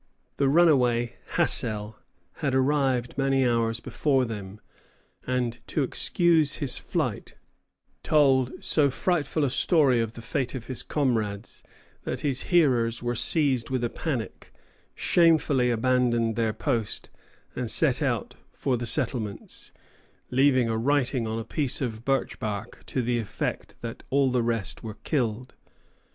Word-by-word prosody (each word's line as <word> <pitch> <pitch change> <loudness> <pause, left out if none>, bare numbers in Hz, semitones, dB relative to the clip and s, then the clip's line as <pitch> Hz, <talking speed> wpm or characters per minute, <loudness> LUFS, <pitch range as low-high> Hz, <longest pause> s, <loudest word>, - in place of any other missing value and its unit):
The 140 -1 +2
runaway, 125 -7 +3 0.2
Hassell, 105 0 +1 0.4
had 140 -4 -1
arrived 130 -2 +1
many 135 -1 +2
hours 115 -1 0
before 130 +2 0
them, 105 -3 -7 0.7
and 125 -2 -1
to 150 - 0
excuse 160 +2 +3
his 135 -4 0
flight - - -3 0.7
told 135 -4 +2
so 145 -3 +3
frightful 155 +1 -1
a 140 - +2
story 140 -4 +3
of 115 -1 -2
the 115 - -10
fate 135 +1 -2
of 120 -3 -6
his 130 -1 -3
comrades 115 -7 -2 0.4
that - - -4
his 140 -3 -1
hearers 125 -10 +2
were 120 0 -1
seized 130 -1 +2
with 130 -2 -1
a 120 - -1
panic, 130 -9 -5 0.4
shamefully 150 -7 +3
abandoned 120 -1 +1
their 115 -2 +1
post, 115 -1 -3 0.4
and - - -3
set - - +2
out - - -1 0.2
for 130 -3 -1
the 120 0 -4
settlements, 115 -4 -3 0.6
leaving 130 -1 +3
a 110 -1 -1
writing 130 -2 +1
on 110 +1 -3
a 115 - -3
piece 145 -5 0
of 115 -4 -4
birch 130 -3 -1
bark 105 +1 -5
to 130 - -1
the 120 0 0
effect 110 - -4
that 115 -1 -6
all 135 -1 +2
the 125 -1 +1
rest 115 -3 -2
were 110 -2 -7
killed. 125 -4 -2
125 Hz, 140 wpm, -26 LUFS, 115-140 Hz, 0.7 s, runaway